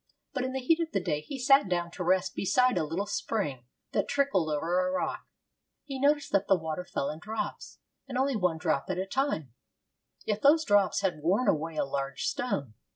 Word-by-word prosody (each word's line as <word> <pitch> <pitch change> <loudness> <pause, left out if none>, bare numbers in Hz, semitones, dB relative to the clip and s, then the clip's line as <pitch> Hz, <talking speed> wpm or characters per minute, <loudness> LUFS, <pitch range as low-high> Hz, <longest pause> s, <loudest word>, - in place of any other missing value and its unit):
But 255 - -1
in 260 0 -3
the 265 - -1
heat 320 +6 +3
of 330 -1 -2
the 195 - +2
day 150 -4 -1
he 275 - -7
sat 270 -3 +4
down 175 -1 -1
to 180 - -5
rest 185 +1 +2
beside 250 +6 +2
a - - +1
little 165 +6 -2
spring 145 - -3 0.2
that - - 0
trickled 275 - +1
over 170 - +1
a - - -1
rock. 275 -1 -2 0.6
He 275 -2 -6
noticed 290 +1 +2
that 200 0 +2
the 195 - +5
water 160 +1 -4
fell 140 -5 -2
in 155 - -8
drops, 220 +5 -5 0.3
and 260 -2 -4
only 270 0 +1
one 180 -6 +1
drop 160 -4 0
at 185 - -1
a 190 - -1
time; 195 - -1 0.7
yet 210 0 -1
those 310 +3 +5
drops 205 -4 +3
had 180 -6 -1
worn 195 +11 +2
away 160 +1 +1
a 150 - +1
large 135 0 -3
stone. 140 - -2
195 Hz, 210 wpm, -29 LUFS, 160-260 Hz, 0.7 s, the